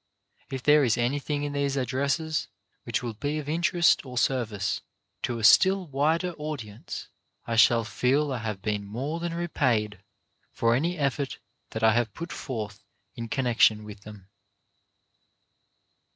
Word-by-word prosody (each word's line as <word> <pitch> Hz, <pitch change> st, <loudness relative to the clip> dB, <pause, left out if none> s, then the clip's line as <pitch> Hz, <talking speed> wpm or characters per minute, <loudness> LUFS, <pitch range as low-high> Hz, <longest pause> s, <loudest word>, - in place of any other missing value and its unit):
If 130 Hz, -2 st, -5 dB
there 150 Hz, 0 st, +6 dB
is 115 Hz, -4 st, +2 dB
anything 145 Hz, +4 st, -1 dB
in 145 Hz, 0 st, -3 dB
these 140 Hz, -1 st, 0 dB
addresses 140 Hz, +4 st, -1 dB, 0.4 s
which 120 Hz, +2 st, -1 dB
will 120 Hz, -2 st, -3 dB
be 145 Hz, +8 st, -3 dB
of 150 Hz, -2 st, -5 dB
interest 170 Hz, +2 st, +3 dB
or 125 Hz, -2 st, -8 dB
service 115 Hz, -6 st, 0 dB, 0.4 s
to 120 Hz, -2 st, -2 dB
a 115 Hz, -, -6 dB
still 190 Hz, -, +6 dB
wider 160 Hz, +5 st, +1 dB
audience, 125 Hz, -9 st, -6 dB, 0.4 s
I 115 Hz, -, -2 dB
shall 115 Hz, +1 st, +5 dB
feel 135 Hz, +5 st, +1 dB
I 125 Hz, -, -3 dB
have 105 Hz, -4 st, -5 dB
been 105 Hz, -1 st, -1 dB
more 130 Hz, +11 st, -4 dB
than 170 Hz, 0 st, -3 dB
repaid 120 Hz, -, 0 dB, 0.5 s
for 115 Hz, 0 st, +1 dB
any 170 Hz, +8 st, 0 dB
effort 140 Hz, -1 st, -1 dB, 0.3 s
that 110 Hz, -, -5 dB
I 110 Hz, 0 st, +6 dB
have 120 Hz, -3 st, 0 dB
put 170 Hz, +1 st, -6 dB
forth 105 Hz, -6 st, -5 dB, 0.3 s
in 115 Hz, -2 st, -6 dB
connection 115 Hz, -4 st, +3 dB
with 105 Hz, -1 st, -10 dB
them. 105 Hz, -3 st, -12 dB
130 Hz, 150 wpm, -27 LUFS, 110-150 Hz, 0.5 s, there